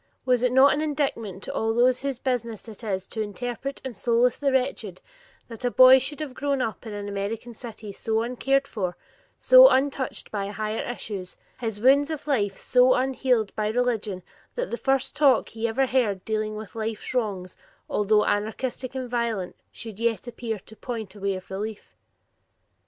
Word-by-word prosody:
Was 250 Hz, -2 st, +3 dB
it 250 Hz, -1 st, +2 dB
not 265 Hz, +2 st, +6 dB
an 300 Hz, -, -1 dB
indictment 270 Hz, -, -2 dB
to -, -, -5 dB
all 225 Hz, 0 st, 0 dB
those 250 Hz, +1 st, +3 dB
whose 275 Hz, -2 st, -2 dB
business 235 Hz, -4 st, -3 dB
it 220 Hz, +1 st, -11 dB
is 190 Hz, -3 st, -2 dB
to 220 Hz, -, -4 dB
interpret 245 Hz, +5 st, -5 dB
and 255 Hz, -3 st, -5 dB
solace 235 Hz, +3 st, +2 dB
the 280 Hz, -1 st, +1 dB
wretched, 265 Hz, +1 st, -1 dB, 0.5 s
that 230 Hz, 0 st, -10 dB
a 245 Hz, -, +2 dB
boy 255 Hz, +1 st, +8 dB
should 280 Hz, +4 st, -4 dB
have 290 Hz, -4 st, -5 dB
grown 280 Hz, 0 st, -1 dB
up 225 Hz, -1 st, -3 dB
in 215 Hz, -, -6 dB
an 205 Hz, 0 st, -5 dB
American 205 Hz, +4 st, -4 dB
city 220 Hz, -2 st, -9 dB
so 220 Hz, +3 st, -1 dB
uncared 270 Hz, +3 st, 0 dB
for, 185 Hz, -5 st, -3 dB, 0.4 s
so -, -, +8 dB
untouched 270 Hz, 0 st, -1 dB
by 200 Hz, -2 st, -2 dB
higher 215 Hz, +2 st, -3 dB
issues, 200 Hz, -6 st, -7 dB, 0.2 s
his 225 Hz, -4 st, -3 dB
wounds 275 Hz, +5 st, +4 dB
of 310 Hz, -3 st, -5 dB
life 205 Hz, -9 st, 0 dB
so 250 Hz, 0 st, +4 dB
unhealed 255 Hz, -4 st, +1 dB
by 215 Hz, -1 st, 0 dB
religion 220 Hz, -5 st, -1 dB, 0.3 s
that -, -, -3 dB
the -, -, 0 dB
first 270 Hz, +3 st, 0 dB
talk 280 Hz, -5 st, +4 dB
he 225 Hz, +1 st, -2 dB
ever 255 Hz, +4 st, +1 dB
heard 225 Hz, -8 st, 0 dB
dealing 215 Hz, -1 st, -2 dB
with 215 Hz, -2 st, -8 dB
life's 220 Hz, 0 st, -4 dB
wrongs, 200 Hz, -7 st, -2 dB, 0.3 s
although 210 Hz, +1 st, +2 dB
anarchistic 245 Hz, +5 st, -2 dB
and 260 Hz, -1 st, -3 dB
violent, 235 Hz, -6 st, -2 dB, 0.2 s
should 220 Hz, -3 st, -9 dB
yet 230 Hz, -3 st, 0 dB
appear 230 Hz, -2 st, -4 dB
to 215 Hz, +3 st, -14 dB
point 220 Hz, -5 st, -6 dB
a 210 Hz, -, -13 dB
way 195 Hz, 0 st, -1 dB
of 185 Hz, 0 st, -10 dB
relief? 210 Hz, +2 st, -6 dB
235 Hz, 180 wpm, -25 LUFS, 210-260 Hz, 0.5 s, boy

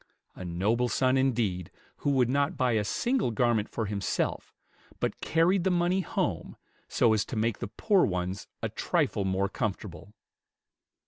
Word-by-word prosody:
A -, -, -9 dB
noble 105 Hz, +8 st, 0 dB
son 130 Hz, +1 st, +2 dB
indeed, 115 Hz, -10 st, 0 dB, 0.3 s
who -, -, -1 dB
would 130 Hz, -4 st, +3 dB
not 140 Hz, +3 st, 0 dB
buy 125 Hz, -1 st, +2 dB
a 110 Hz, -2 st, +2 dB
single 240 Hz, -, 0 dB
garment 115 Hz, -2 st, +1 dB
for 110 Hz, -, -3 dB
himself, 100 Hz, -1 st, -2 dB, 0.5 s
but -, -, -2 dB
carried 170 Hz, +3 st, +2 dB
the 190 Hz, -, +2 dB
money 175 Hz, +1 st, +2 dB
home, -, -, -2 dB, 0.3 s
so 115 Hz, -, +3 dB
as 105 Hz, -2 st, +2 dB
to -, -, -6 dB
make 110 Hz, 0 st, 0 dB
the -, -, -3 dB
poor 200 Hz, -, +2 dB
ones 90 Hz, +1 st, -2 dB, 0.2 s
a -, -, 0 dB
trifle 100 Hz, -, 0 dB
more 95 Hz, +1 st, +1 dB
comfortable! 100 Hz, -3 st, -4 dB
115 Hz, 155 wpm, -28 LUFS, 100-140 Hz, 0.5 s, would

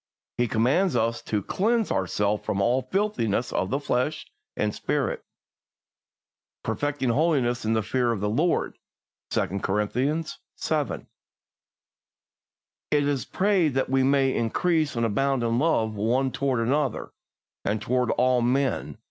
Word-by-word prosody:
He 120 Hz, -, +1 dB
commands 130 Hz, -, +2 dB
us 115 Hz, 0 st, 0 dB
to 105 Hz, -2 st, -2 dB
"cleanse 225 Hz, -, 0 dB
ourselves 100 Hz, +2 st, 0 dB
from 100 Hz, -, -2 dB
all 120 Hz, +6 st, +2 dB
filthiness 185 Hz, -, -1 dB
of 95 Hz, -, 0 dB
the 135 Hz, -, 0 dB
flesh 145 Hz, +2 st, -1 dB, 0.3 s
and -, -, 0 dB
spirit, 485 Hz, -1 st, -2 dB, 1.4 s
perfecting 145 Hz, -3 st, -1 dB
holiness 125 Hz, -4 st, +1 dB
in 110 Hz, -, +1 dB
the 110 Hz, -1 st, +1 dB
fear 125 Hz, +2 st, +1 dB
of 115 Hz, -, -2 dB
the 105 Hz, -, -1 dB
Lord" 150 Hz, +12 st, 0 dB, 0.5 s
(2 100 Hz, 0 st, -1 dB
Cor. 105 Hz, +2 st, 0 dB
vii. 140 Hz, +9 st, 0 dB, 0.4 s
1). -, -, -1 dB, 1.8 s
It 145 Hz, -1 st, +2 dB
is 140 Hz, -3 st, -1 dB
prayed 185 Hz, -8 st, +1 dB
that 135 Hz, -1 st, 0 dB
we 135 Hz, 0 st, +3 dB
may 135 Hz, 0 st, +3 dB
"increase 155 Hz, +6 st, +1 dB
and 115 Hz, 0 st, +1 dB
abound 135 Hz, +3 st, +1 dB
in 115 Hz, +1 st, +1 dB
love 120 Hz, -8 st, +1 dB
one 120 Hz, +6 st, +1 dB
toward 130 Hz, -3 st, 0 dB
another, 135 Hz, +1 st, 0 dB, 0.5 s
and 105 Hz, +2 st, 0 dB
toward 125 Hz, +3 st, 0 dB
all 125 Hz, 0 st, +2 dB
men... 130 Hz, +2 st, 0 dB
125 Hz, 140 wpm, -26 LUFS, 115-145 Hz, 1.8 s, we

